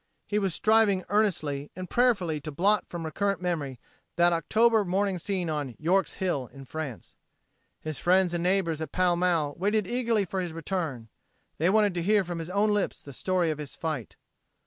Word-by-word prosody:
He 210 - 0
was 190 -5 -1
striving 215 -3 +3
earnestly 155 -9 0
and 185 0 -6
prayerfully 190 -12 +1
to 155 - -6
blot 200 +7 +2
from 170 -2 -5
recurrent 200 +5 -1
memory 155 -8 -3 0.4
that 175 0 +4
October 220 +6 +3
morning 190 0 0
scene 185 -1 -2
on 145 -6 -3
"York's 185 +5 +1
Hill" 160 -9 -1
in 135 -1 -11
France. 140 -4 -6 0.7
His 155 -2 -5
friends 180 0 +3
and 170 - -1
neighbors 180 -4 +1
at 155 -2 -4
Pall 180 -1 +2
Mall 170 -5 +1
waited 210 +2 +1
eagerly 230 -2 0
for 190 +1 -3
his 175 -3 -4
return. 160 - -4 0.5
They 165 +4 +3
wanted 205 -1 +3
to 175 - -2
hear 205 +3 +3
from 175 -1 -5
his 165 +1 -5
own 205 +3 +2
lips 205 -2 -1
the 140 - -10
story 180 +3 0
of 155 - -5
his 145 -2 -7
fight. 155 -9 -4
180 Hz, 185 wpm, -27 LUFS, 155-200 Hz, 0.7 s, that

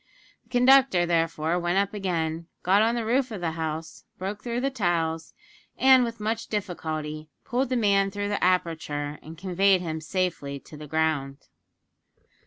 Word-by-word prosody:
The - - -31
Conductor, 250 -7 +5
therefore, 165 0 0
went 175 +1 0
up 200 +1 +1
again, 165 -5 -2 0.2
got 195 +3 +4
on 230 +2 +2
the 235 -2 -2
roof 255 +3 +1
of 215 -4 -6
the 170 -2 -1
house, 160 0 -5
broke 200 +3 -5
through 240 +1 -2
the 275 +1 0
tiles, 165 -8 -1 0.4
and 260 -1 +6
with 230 -1 -4
much 220 +2 -2
difficulty 155 -6 -4 0.2
pulled 255 0 0
the 255 - +1
man 200 -3 +3
through 205 +1 -3
the 205 - -1
aperture 160 -5 0
and 160 +1 -11
conveyed 190 +1 +2
him 160 -2 -4
safely 160 -5 -2
to - - -13
the 150 0 -9
ground. 145 -3 -1
180 Hz, 165 wpm, -26 LUFS, 160-215 Hz, 0.4 s, and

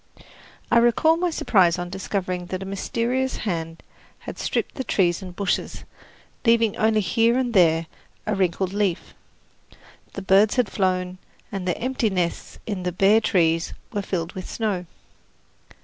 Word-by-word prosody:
I 235 - +6
recall 240 +7 +4
my 355 +1 0
surprise 185 - +3
on 175 0 -5
discovering 185 -2 -3
that 185 +1 -4
a - - -7
mysterious 235 +6 -1
hand 165 -5 -4 0.3
had - - -9
stripped - - -2
the 265 - -4
trees 175 -6 +1
and 180 -2 -9
bushes, 200 -1 -2 0.6
leaving 230 -3 +3
only 215 0 +2
here 230 +5 +2
and 250 -2 -1
there 165 -4 +4 0.4
a 215 - 0
wrinkled 190 -1 0
leaf. 200 -4 -1 1.0
The 195 - -6
birds 195 +3 +4
had 245 -6 +1
flown, 185 -1 -1 0.3
and 190 -2 -4
their 180 - 0
empty 250 -2 0
nests 180 -3 -3
in 200 -4 -3
the 180 0 -2
bare 195 +5 +4
trees 165 -6 +1 0.2
were 205 - -1
filled 175 -3 -3
with 185 - -7
snow. 200 -6 -2
195 Hz, 150 wpm, -23 LUFS, 180-225 Hz, 1.0 s, I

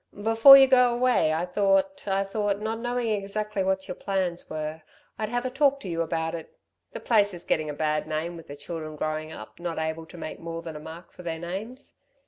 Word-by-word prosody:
"Before 225 +5 +9
you 270 - +8
go 250 -2 +5
away 240 -10 +2
I 160 +3 0
thought 200 +9 +1
I 195 0 +1
thought, 200 0 -1
not 220 +1 -3
knowing 240 0 -1
exactly 210 0 -2
what 190 0 -1
your - - -4
plans 185 -3 -3
were, 155 0 -5 0.4
I'd 215 -1 -2
have 245 +2 -2
a 255 - -2
talk 280 +1 +2
to - - -7
you 165 -1 -2
about 165 0 -2
it. 165 -2 -8 0.3
The - - -6
place 205 -4 +2
is 175 - -9
gettin' 155 -1 0
a - - -3
bad 155 +1 -1
name 160 +3 -3
with 165 - -11
the 145 - -8
children 155 +1 -7
growing 155 +1 -3
up 110 -2 -11
not 170 -1 -4
able 160 +1 -3
to 175 - -13
make 155 -1 -7
more 165 0 -6
than 165 -2 -7
a - - -6
mark 165 +3 -10
for - - -13
their 165 -2 -4
names. 200 +11 -7
180 Hz, 225 wpm, -26 LUFS, 160-220 Hz, 0.4 s, Before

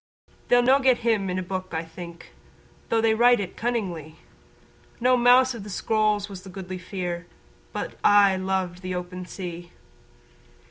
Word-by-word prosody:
They'ss 245 0 +4
no' 265 +2 +5
get 260 -2 +4
him 210 -5 +2
a' - - -1
in - - -2
a 185 - -2
book 185 -1 -5
I 160 +1 -2
think 170 +1 -11 0.6
Though 225 - +2
they 225 0 +3
write 240 +1 +5
it 190 -3 -5
cunningly; 185 -10 -3 0.8
No 250 +1 +4
mouse 250 +1 +5
of 230 -4 -8
the 210 - -9
scrolls 210 0 0
was 195 -3 -9
the 190 - -11
Goodly 185 -1 -7
Fere 180 -2 -5 0.4
But - - -5
aye 200 -2 +6
loved 185 -1 -2
the 185 -1 -4
open 180 0 -6
sea. 175 -2 -7
190 Hz, 170 wpm, -25 LUFS, 180-225 Hz, 0.8 s, aye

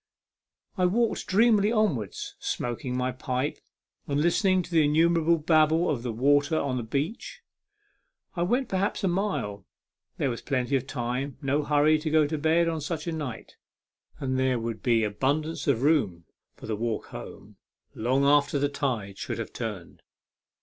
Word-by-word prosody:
I 180 - +4
walked 230 +4 0
dreamily 215 +1 +4
onwards, 190 - -1
smoking 125 +1 -3
my 125 0 0
pipe, 130 +2 -3 0.5
and 145 0 0
listening 185 +3 +2
to 175 - -13
the 165 -2 +4
innumerable 165 +2 +3
babble 160 +1 +3
of 130 -6 -2
the 120 -1 -3
waters 140 +6 +2
upon 140 -5 0
the - - -1
beach. 140 - -4 0.9
I 170 - -2
went 245 +9 +1
perhaps 195 +2 -1
a - - +3
mile. 175 - -2 0.5
There 135 - 0
was 120 - -5
plenty 130 0 -1
of 135 0 -1
time; 125 +2 -3
no 140 +1 0
hurry 150 +1 +3
to 155 +1 -3
go 155 0 +4
to 150 +1 -3
bed 160 +2 +3
on 160 -2 -2
such 155 +1 -4
a 170 - -2
night, 145 -8 -6 0.6
and 130 -2 -1
there 130 -1 +2
would 115 -2 -4
be 115 -3 +2
abundance 140 +11 -1
of 130 -3 +2
room 105 - +1 0.3
for - - -11
the 110 - -2
walk 115 0 -3
home, - - -10 0.4
long 130 +5 +1
after 145 0 +3
the 145 0 +1
tide 115 -9 -3
should - - -4
have - - -6
turned. - - -6
145 Hz, 165 wpm, -27 LUFS, 125-165 Hz, 0.9 s, I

